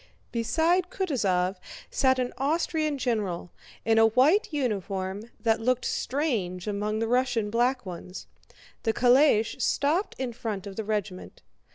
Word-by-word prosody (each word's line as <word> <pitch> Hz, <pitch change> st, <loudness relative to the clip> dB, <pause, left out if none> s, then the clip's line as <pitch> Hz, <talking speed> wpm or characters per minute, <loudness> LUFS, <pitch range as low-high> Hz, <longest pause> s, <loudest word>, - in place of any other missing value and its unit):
Beside 325 Hz, +10 st, +1 dB
Kutúzov 195 Hz, -, 0 dB, 0.3 s
sat 260 Hz, -1 st, +3 dB
an 250 Hz, -1 st, -2 dB
Austrian 310 Hz, +1 st, 0 dB
general, 210 Hz, -9 st, -2 dB, 0.3 s
in 225 Hz, 0 st, +4 dB
a 225 Hz, -, +7 dB
white 270 Hz, -, +3 dB
uniform 200 Hz, -, -3 dB
that 225 Hz, -1 st, +1 dB
looked 255 Hz, +1 st, +1 dB
strange 220 Hz, -, -1 dB
among 210 Hz, +1 st, -1 dB
the 225 Hz, +1 st, -1 dB
Russian 245 Hz, -3 st, +1 dB
black 245 Hz, +1 st, +1 dB
ones. 180 Hz, 0 st, -8 dB, 0.6 s
The 225 Hz, -, 0 dB
calèche 245 Hz, -2 st, +4 dB
stopped 320 Hz, +8 st, +1 dB
in 255 Hz, -2 st, -3 dB
front 215 Hz, -4 st, -4 dB
of 200 Hz, -1 st, -7 dB
the 220 Hz, -, -3 dB
regiment. 205 Hz, -3 st, -4 dB
230 Hz, 135 wpm, -27 LUFS, 205-270 Hz, 0.6 s, a